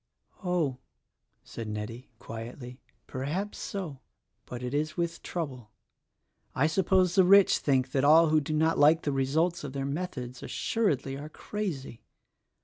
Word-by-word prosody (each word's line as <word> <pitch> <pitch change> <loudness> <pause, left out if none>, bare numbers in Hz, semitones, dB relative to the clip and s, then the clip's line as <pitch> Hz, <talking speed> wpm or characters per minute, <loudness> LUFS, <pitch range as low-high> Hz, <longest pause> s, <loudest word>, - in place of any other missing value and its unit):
"Oh," 165 -8 0 0.6
said 115 - -7
Nettie, 105 +4 -6
quietly, 120 +3 -8 0.2
"perhaps 155 +11 -4
so; 170 -9 -5 0.5
but 125 0 -6
it 125 +1 -4
is 155 +3 -1
with 170 -1 -2
trouble. 130 -10 -5 0.9
I 135 - +3
suppose 185 +2 +3
the 190 0 +6
rich 200 +2 +6
think 130 -2 +1
that 135 0 +1
all 160 +3 +7
who 155 0 +4
do 150 +2 -3
not 160 +1 +2
like 155 +3 +5
the 145 - 0
results 150 +6 +1
of 140 -3 -6
their 135 -1 -2
methods, 135 -5 -4
assuredly 140 - -1
are 150 +2 -7
crazy. 160 - -5
145 Hz, 140 wpm, -29 LUFS, 130-170 Hz, 0.9 s, all